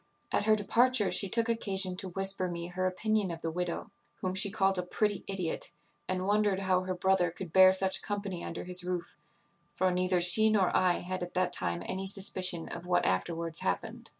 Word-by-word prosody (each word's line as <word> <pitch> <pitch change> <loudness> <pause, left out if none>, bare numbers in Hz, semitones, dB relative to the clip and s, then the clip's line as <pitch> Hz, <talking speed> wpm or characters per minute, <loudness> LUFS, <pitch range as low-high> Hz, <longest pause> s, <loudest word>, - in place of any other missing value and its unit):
At - - +1
her 215 0 +5
departure 230 +1 +2
she 195 - +2
took 230 +3 +1
occasion 195 -5 0
to 190 - -4
whisper 195 0 0
me 170 -1 -5
her 185 +1 -1
opinion 210 +2 0
of 165 -1 -7
the 165 - -2
widow, 180 +5 -4 0.2
whom 185 -1 -3
she 190 +1 +3
called 195 -2 +1
a - - +1
pretty 205 +3 -1
idiot, 185 -4 -2 0.4
and 185 0 -2
wondered 205 -1 +1
how 185 -1 +2
her 185 0 -3
brother 185 -1 +2
could 170 0 -9
bear 185 0 +8
such 190 0 0
company 200 -4 -4
under 165 - -5
his 180 0 +1
roof; 180 -1 -4 0.6
for 185 0 +1
neither 180 0 +1
she 185 +6 +5
nor 200 -4 +2
I 180 -1 +2
had 185 +1 -4
at 175 0 -6
that 185 0 0
time 85 0 -2
any 190 +1 -4
suspicion 185 -3 +1
of 170 +1 -8
what 175 0 +2
afterwards 165 - -1
happened. 90 - -3
185 Hz, 200 wpm, -30 LUFS, 180-195 Hz, 0.6 s, bear